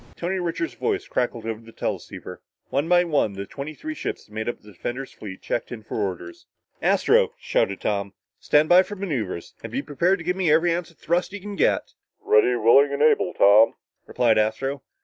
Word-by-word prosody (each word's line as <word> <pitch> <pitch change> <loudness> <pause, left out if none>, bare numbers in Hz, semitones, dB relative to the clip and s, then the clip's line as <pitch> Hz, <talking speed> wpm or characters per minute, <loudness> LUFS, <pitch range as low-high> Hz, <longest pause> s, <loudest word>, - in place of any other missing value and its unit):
Tony 185 +2 -2
Richards' 175 - -2
voice 400 -3 -2
crackled 120 -2 -2
over 115 0 -4
the 115 0 -14
teleceiver. - - -6 0.3
One 145 +4 0
by 175 0 +5
one 150 - +1
the 100 0 -6
twenty 145 +7 -7
three 315 - -6
ships - - -5
that 105 - -21
made 110 +2 -3
up - - -5
the 105 - -16
defender's 125 +8 -5
fleet 95 -3 -10
checked - - -3
in 115 -3 -7
for - - -6
orders. 90 -3 -5 0.3
"Astro," - - +3
shouted 100 - -1
Tom, 100 -2 -2 0.2
"stand 150 +1 +3
by 180 +2 +7
for 205 +2 -6
maneuver 140 - -3 0.2
and 115 - -8
be 135 +4 -2
prepared 170 +6 +1
to 165 - -10
give 180 +1 0
me 185 -5 +1
every 165 +2 +4
ounce 170 -1 -3
of 170 - -23
thrust 175 +3 -1
you 205 - -5
can 205 +1 -7
get!" - - +1 0.3
"Ready, 105 +4 +3
willing 135 +5 +5
and 140 +1 0
able, 155 - +3
Tom," 105 +3 +6 0.3
replied 115 -3 +2
Astro. 135 +6 -1
140 Hz, 205 wpm, -24 LUFS, 110-175 Hz, 0.3 s, by